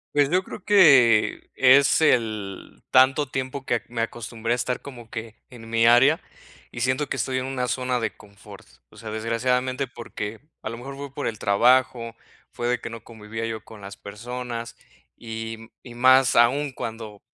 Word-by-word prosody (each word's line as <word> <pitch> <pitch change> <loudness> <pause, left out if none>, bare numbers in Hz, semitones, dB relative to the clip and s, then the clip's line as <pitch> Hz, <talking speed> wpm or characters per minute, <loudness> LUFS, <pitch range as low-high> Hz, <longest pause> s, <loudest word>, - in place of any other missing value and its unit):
Pues 145 -1 +3
yo 185 +2 +2
creo 205 - -10
que 135 - +5
es 135 +3 +5
el 110 -9 -1
tanto 130 +3 +5
tiempo 130 +1 -5
que 120 -3 0
me 120 -1 -4
acostumbré 115 0 -3
a - - +2
estar 125 +1 -2
como 120 -5 -11
que 115 -1 -7
en 115 -3 -12
mi 115 0 +2
área 135 +7 +5 0.5
y 120 - -7
siento 130 +3 0
que - - -2
estoy 130 -1 -1
en 130 - -4
una 130 -2 -2
zona 125 +2 -1
de 110 - -3
confort. 100 -9 -15 0.2
O - - -18
sea, 110 -2 -8
desgraciadamente, 125 +4 -1
porque 115 -2 -7 0.2
a - - -5
lo 115 - -6
mejor 135 +3 -9
fue 140 -1 -7
por 145 - -5
el 110 -3 -3
trabajo, 115 +2 +2 0.4
fue 120 -1 -4
de 125 -1 0
que 115 - -7
no 115 - -9
convivía 110 0 -7
yo 110 -1 -5
con 110 -2 -13
las 100 0 -9
personas 120 +2 -7 0.4
y 115 0 -7
y 120 -2 -12
más 130 +1 +5
aún 130 +4 +3
cuando, 110 -3 -7
120 Hz, 180 wpm, -24 LUFS, 115-130 Hz, 0.5 s, que